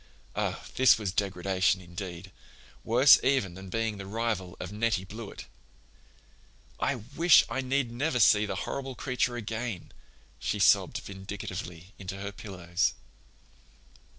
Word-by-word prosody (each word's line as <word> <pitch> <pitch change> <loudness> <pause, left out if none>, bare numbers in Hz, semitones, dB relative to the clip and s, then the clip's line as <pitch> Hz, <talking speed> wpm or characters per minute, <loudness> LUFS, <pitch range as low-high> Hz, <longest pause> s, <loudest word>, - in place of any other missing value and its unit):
Oh, - - -2
this 130 -1 +6
was 105 -4 -2
degradation, 95 -1 +1
indeed—worse 95 - +1
even 130 -10 +2
than 95 +1 -10
being 115 0 -1
the 95 - -7
rival 105 -4 -2
of 90 - -6
Nettie 105 -2 0
Blewett! 110 +1 -8 1.3
"I - - +1
wish 145 +9 +4
I 130 +3 -1
need 130 -2 0
never 125 +2 -1
see 105 -1 +5
the - - -3
horrible 135 -1 -4
creature 125 -1 -1
again," 115 -3 -4 0.5
she - - -2
sobbed - - +4
vindictively 95 -2 -7
into 95 0 -6
her 100 +1 -5
pillows. 95 -4 -2
105 Hz, 125 wpm, -29 LUFS, 95-120 Hz, 1.3 s, this